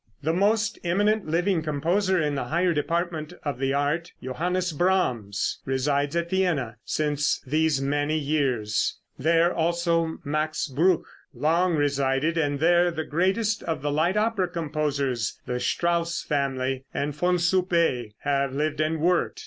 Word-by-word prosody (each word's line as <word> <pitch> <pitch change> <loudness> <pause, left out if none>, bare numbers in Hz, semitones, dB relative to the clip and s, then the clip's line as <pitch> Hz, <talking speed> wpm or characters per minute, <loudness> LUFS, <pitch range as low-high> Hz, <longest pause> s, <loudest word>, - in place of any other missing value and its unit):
The 160 +3 +1
most 215 +4 +1
eminent 205 +4 +1
living 175 +2 +1
composer 175 +6 +1
in 150 -2 0
the 135 -3 -2
higher 170 +6 +1
department 165 0 -2
of 145 -4 -3
the 135 0 0
art, 145 +4 -1
Johannes 180 +7 -1
Brahms, 125 - 0
resides 140 +3 0
at 170 0 -1
Vienna 160 - 0
since 150 -1 0
these 155 0 +1
many 145 +2 0
years; 135 -8 0 0.2
there 165 +4 +3
also 170 0 0
Max 155 +2 -1
Bruch 165 +6 +2 0.3
long 170 +3 +2
resided, 140 +1 +1
and 145 -3 0
there 175 +2 +4
the 160 -2 -3
greatest 190 +7 0
of 160 -4 -3
the 145 - 0
light 165 +7 +1
opera 210 -3 +1
composers, 145 -8 -2
the 125 0 -2
Strauss 170 +3 0
family 135 -2 -1
and 145 +1 -2
Von 180 +3 +2
Suppé, 170 - +1
have 140 -1 0
lived 155 +1 -1
and 155 0 0
worked. 175 +1 +1
155 Hz, 140 wpm, -25 LUFS, 140-175 Hz, 0.3 s, there